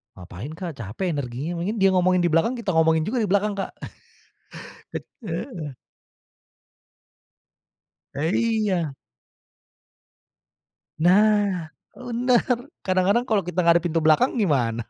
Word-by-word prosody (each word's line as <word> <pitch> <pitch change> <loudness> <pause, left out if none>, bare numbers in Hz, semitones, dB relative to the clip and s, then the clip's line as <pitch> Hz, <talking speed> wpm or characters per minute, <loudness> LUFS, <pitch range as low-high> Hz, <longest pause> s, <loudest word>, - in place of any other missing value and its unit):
Ngapain 95 - -9
Kak, 165 -3 -7
capek 115 - -4
energinya. 145 +3 -4 0.2
dia 195 - +6
ngomongin 185 -1 +3
di 175 - +2
belakang, 165 +9 +2
kita 235 -5 -4
ngomongin 160 -2 +3
juga 215 +11 -2
di 225 - +1
belakang, 200 +2 +2
Kak. 195 - -3 1.5
Eh, 200 - -5
heeh. 165 - -5 2.4
Eh, 155 +5 -1
iya. 210 -9 0 2.1
Nah, 195 -2 +3 0.2
bener. 245 0 +1 0.4
Kadang-kadang 190 +6 +2
kalau 220 -5 +1
kita 180 0 -2
nggak 170 - +7
ada - - -21
pintu 165 -1 +1
belakang 160 - +3
gimana? 120 - +1
180 Hz, 115 wpm, -24 LUFS, 155-210 Hz, 2.4 s, nggak